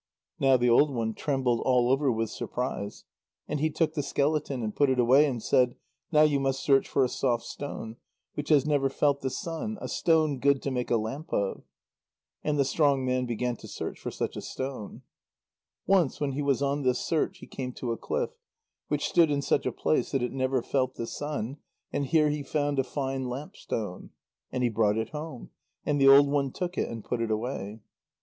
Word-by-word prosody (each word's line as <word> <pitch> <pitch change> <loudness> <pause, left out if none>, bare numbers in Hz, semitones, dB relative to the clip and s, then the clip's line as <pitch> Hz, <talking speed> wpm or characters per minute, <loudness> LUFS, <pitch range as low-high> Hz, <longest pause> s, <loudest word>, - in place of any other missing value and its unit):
Now 135 -1 +5
the 125 0 +1
old 140 +5 +5
one 115 -3 -1
trembled 130 -2 0
all 125 -1 +3
over 135 0 +3
with 115 -1 -1
surprise. 105 -5 -4 0.4
And 150 - -2
he 155 +2 +2
took 155 +1 0
the 155 - -1
skeleton, 140 -2 0
and 105 -1 -3
put 145 -2 +3
it 130 - +2
away, 130 +5 +6
and 120 -5 -3
said: 125 -1 +3 0.4
"Now 155 -1 +6
you 145 -2 +3
must 135 0 -1
search 135 -2 +4
for 135 - +3
a - - +3
soft 120 -2 0
stone, 115 -5 -6 0.4
which 145 - -5
has 145 -3 +5
never 145 -3 +2
felt 140 +1 +1
the 130 - -1
sun, 170 +10 -4
a - - -5
stone 155 -5 +2
good 140 +1 +3
to 140 - -1
make 125 -1 -2
a 120 - +3
lamp 125 +9 -5
of." 100 -1 -1 0.8
And 150 -1 0
the 140 - +3
strong 140 -2 +2
man 125 0 0
began 120 +1 -2
to - - -11
search - - -5
for - - -4
such - - -3
a - - -5
stone. 130 -6 -6 0.8
Once 185 -8 +3
when 145 -2 0
he 140 +2 -2
was 140 -1 +1
on 140 +1 0
this 125 -2 +2
search, 160 -2 -1
he - - -11
came 125 -2 -5
to 120 -1 -4
a - - 0
cliff, - - -2 0.6
which - - 0
stood 170 -3 +4
in 140 -1 0
such - - +1
a - - 0
place 80 - 0
that 135 -3 +1
it 125 - -1
never 130 -2 0
felt 130 -1 0
the 115 - -4
sun, 145 -1 -4 0.4
and 140 - -1
here 155 -1 +4
he 150 0 -2
found 145 0 -1
a - - +3
fine 135 0 -3
lamp 135 +5 -6
stone. 105 -5 -5 0.4
And 125 -1 -1
he 120 - +3
brought 110 -1 +2
it 110 0 -2
home, 150 -4 -7 0.3
and 145 -1 +1
the 135 - +6
old 140 +1 +8
one 140 -1 0
took 180 +3 -4
it - - -1
and 115 -2 -7
put 120 -2 -2
it 115 - -1
away. 110 -1 -3
135 Hz, 215 wpm, -28 LUFS, 125-145 Hz, 0.8 s, old